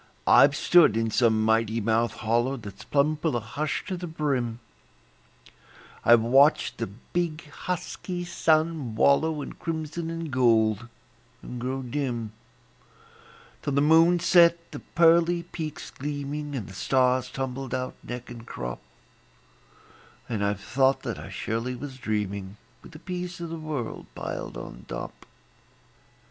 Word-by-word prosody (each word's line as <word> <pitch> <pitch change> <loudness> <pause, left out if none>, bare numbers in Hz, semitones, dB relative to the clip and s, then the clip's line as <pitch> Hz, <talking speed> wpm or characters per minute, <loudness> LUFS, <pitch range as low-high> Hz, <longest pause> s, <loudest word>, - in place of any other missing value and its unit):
I've 135 +3 +6
stood 155 -9 +5
in 115 -1 0
some 110 -2 +3
mighty 110 0 +2
mouthed 115 +2 0
hollow 120 +4 +1
That's 100 -4 -10
plumb 150 +2 +2
full 155 -3 -1
of 120 - -2
hush 145 +7 -3
to 190 - -3
the 175 0 -5
brim; 135 -8 -1 1.4
I've 120 -1 +6
watched 135 +6 +4
the 115 - -1
big, 155 - -4
husky 180 +1 -4
sun 155 -7 +1
wallow 145 +5 +3
In - - -7
crimson 160 0 -4
and 165 -2 -5
gold, 115 -3 +3 0.6
and 125 -1 -7
grow 130 +2 -3
dim, 120 -4 -3 1.3
Till 145 - -2
the 140 - +3
moon 165 +3 +5
set 170 -1 +4
the - - -6
pearly 170 +1 +3
peaks 160 -3 -6
gleaming, 145 +1 -4
And 115 -7 -4
the - - -10
stars 130 +2 +2
tumbled 135 -1 -4
out, 130 0 -3
neck 125 0 -7
and 120 -1 -9
crop; - - -6 1.5
And 110 -4 -2
I've 100 -1 -1
thought 135 +3 +2
that - - -4
I - - -8
surely 115 +3 -3
was 135 0 -8
dreaming, 100 -4 -3 0.2
With - - -14
the - - -9
peace 180 +1 -5
o' 170 - -4
the 165 0 -5
world 150 -7 -5
piled - - -5
on - - -9
top. - - -7
135 Hz, 140 wpm, -26 LUFS, 115-160 Hz, 1.5 s, I've